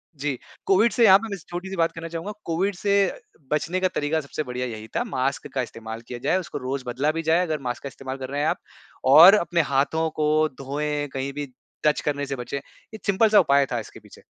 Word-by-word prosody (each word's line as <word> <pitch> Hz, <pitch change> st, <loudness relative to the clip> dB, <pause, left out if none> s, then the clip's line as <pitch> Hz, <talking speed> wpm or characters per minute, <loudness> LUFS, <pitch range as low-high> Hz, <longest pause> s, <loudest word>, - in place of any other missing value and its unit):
जी, 140 Hz, -2 st, -2 dB, 0.3 s
Covid 205 Hz, +4 st, +4 dB
से 235 Hz, -2 st, +4 dB
यहाँ 190 Hz, -1 st, +9 dB
पे 225 Hz, -, -6 dB
मैं 200 Hz, -, -3 dB
छोटी 175 Hz, +2 st, -5 dB
सी 195 Hz, -, -5 dB
बात 165 Hz, -2 st, +2 dB
करना 165 Hz, 0 st, -7 dB
चाहूँगा, 170 Hz, +5 st, -5 dB
कोविड 185 Hz, +4 st, 0 dB
से 200 Hz, +3 st, -1 dB, 0.6 s
बचने 165 Hz, +5 st, 0 dB
का 185 Hz, -, +2 dB
तरीका 150 Hz, +2 st, 0 dB
सबसे 150 Hz, +2 st, -5 dB
बढ़िया 125 Hz, -1 st, -4 dB
यही 110 Hz, -1 st, -7 dB
था, 240 Hz, -, +1 dB
मास्क 140 Hz, -, -2 dB
का 130 Hz, -, 0 dB
इस्तेमाल 115 Hz, -2 st, -7 dB
किया 120 Hz, -1 st, -6 dB
जाए, 185 Hz, -, +3 dB
उसको 180 Hz, -, -6 dB
रोज 130 Hz, 0 st, -4 dB
बदला 135 Hz, +5 st, 0 dB
भी 165 Hz, +1 st, -3 dB
जाए 170 Hz, +2 st, +4 dB
अगर 155 Hz, -2 st, -2 dB
मास्क 120 Hz, -, -5 dB
का -, -, -4 dB
इस्तेमाल 135 Hz, 0 st, -7 dB
कर 130 Hz, -1 st, -6 dB
रहे 145 Hz, +1 st, -2 dB
हैं 150 Hz, -, +1 dB
आप। -, -, 0 dB, 0.5 s
और 180 Hz, +7 st, +10 dB
अपने 170 Hz, -3 st, +1 dB
हाथों 160 Hz, +4 st, +1 dB
को 155 Hz, +1 st, +3 dB
धोएँ, 145 Hz, +2 st, -2 dB
कहीं 135 Hz, +1 st, -3 dB
भी 145 Hz, 0 st, -4 dB, 0.4 s
टच 150 Hz, -, +2 dB
करने 145 Hz, -1 st, -1 dB
से 140 Hz, -1 st, -4 dB
बचें, 125 Hz, +3 st, -5 dB
ये 215 Hz, +9 st, -13 dB
सिंपल 205 Hz, +3 st, +3 dB
सा 210 Hz, -, +7 dB
उपाय 140 Hz, 0 st, +4 dB
था 120 Hz, -, 0 dB
इसके 110 Hz, -, -10 dB
पीछे। -, -, -17 dB
150 Hz, 235 wpm, -24 LUFS, 135-175 Hz, 0.6 s, और